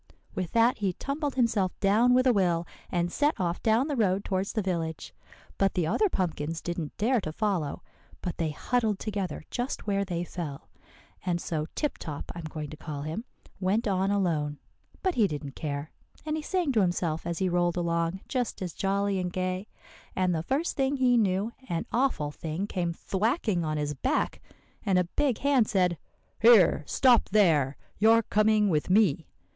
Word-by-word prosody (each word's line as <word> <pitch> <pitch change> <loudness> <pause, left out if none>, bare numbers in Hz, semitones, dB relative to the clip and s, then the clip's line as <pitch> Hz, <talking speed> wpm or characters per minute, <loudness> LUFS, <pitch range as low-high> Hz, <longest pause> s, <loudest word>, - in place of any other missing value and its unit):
With 180 -3 -4
that 230 +1 +4
he 195 -3 0
tumbled 280 - -3
himself 225 -7 +1
down 220 +5 +4
with 255 +1 +4
a 255 - +5
will, 175 -4 +2 0.3
and 175 -1 0
set 295 - +1
off 175 -1 -1
down 225 +5 +3
the 295 - -1
road 200 -4 +1
towards 190 +1 -1
the 220 - 0
village. 165 -4 -3 0.5
But 195 -1 +2
the 175 - +1
other 415 - +2
pumpkins 165 - -2
didn't 170 -3 -5
dare 235 +2 +2
to 155 - -4
follow, 180 -6 -1 0.4
but 180 -3 -3
they 165 -2 0
huddled 220 +6 0
together 200 -4 -4
just 245 +2 -3
where 200 -1 +1
they 175 -3 -3
fell. 165 -6 -6 0.5
And 175 -2 0
so 155 -3 -3
Tip 295 - -2
Top, 150 -3 -6
I'm 170 -2 -7
going 155 -1 -6
to 155 - -8
call 150 -2 -6
him, 160 +10 -4 0.3
went 200 +5 +1
on 190 -1 +1
alone. 160 -7 0 0.5
But 375 -2 +2
he 220 -8 +3
didn't 145 -4 -6
care, 145 0 -4 0.3
and 305 0 -1
he 315 - -2
sang 350 -2 0
to 225 -5 +3
himself 175 -3 -1
as 170 -1 -2
he 190 - +1
rolled 175 -1 +1
along 170 +1 0
just 250 -3 -2
as 175 -3 -4
jolly 200 0 0
and 180 -1 -2
gay; 185 +2 -2 0.5
and 185 -1 +2
the 160 - 0
first 275 - -1
thing 275 0 +1
he 255 -2 +4
knew, 205 -1 +1 0.2
an 170 -1 -1
awful 235 - +1
thing 160 +5 -4
came 180 -4 -2
thwacking 200 - 0
on 155 -1 -1
his 150 0 -1
back, 135 - -1 0.4
and 190 -2 +2
a 180 - +4
big 255 +7 0
hand 270 -5 +3
said, 180 - +1 0.4
'Here, 220 -9 +6
stop 250 -3 +4
there! 160 -10 +3 0.2
you're 225 +2 +5
coming 215 0 +3
with 155 -4 0
me. 185 -6 +3
190 Hz, 185 wpm, -28 LUFS, 170-225 Hz, 0.5 s, Here